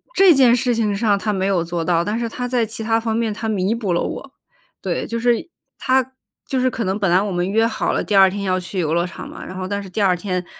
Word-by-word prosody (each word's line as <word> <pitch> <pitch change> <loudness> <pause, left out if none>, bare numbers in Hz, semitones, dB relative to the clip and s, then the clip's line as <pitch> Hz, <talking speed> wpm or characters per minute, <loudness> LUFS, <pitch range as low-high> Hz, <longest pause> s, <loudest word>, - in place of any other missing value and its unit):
这 385 -3 +7
件 250 -3 +5
事 245 0 0
情 215 -3 0
上 205 -1 +2
他 210 +2 -2
没 190 -1 -1
有 190 -4 +1
做 170 0 -3
到， 170 0 +1
但 210 +4 -2
是 235 -1 -2
他 250 +2 -4
在 245 -2 +1
其 220 +1 -6
它 225 +1 +2
方 225 -1 -2
面 225 -2 0
他 225 +1 -4
弥 200 0 0
补 220 -5 -2
了 170 - +1
我。 275 - -5 0.5
对， - - -2
就 230 0 -3
是， 240 +6 +1 0.3
他 260 0 +1 0.3
就 265 - -1
是 255 - +2
可 235 - -3
能 190 0 -1
本 195 -4 0
来 180 +2 +4
我 205 -1 -2
们 175 +1 -1
约 225 +3 +3
好 230 - -1
了， - - -1
第 210 - -1
二 190 -1 +7
天 200 +1 -5
要 185 -1 0
去 185 +1 -5
游 160 -2 0
乐 170 +1 +1
场 180 - -8
嘛， - - -9
然 185 - -8
后 185 0 -4
但 200 0 -3
是 195 - -10
第 205 +3 -3
二 185 -2 +3
天 180 0 -3
205 Hz, 305 characters per minute, -20 LUFS, 185-230 Hz, 0.5 s, 这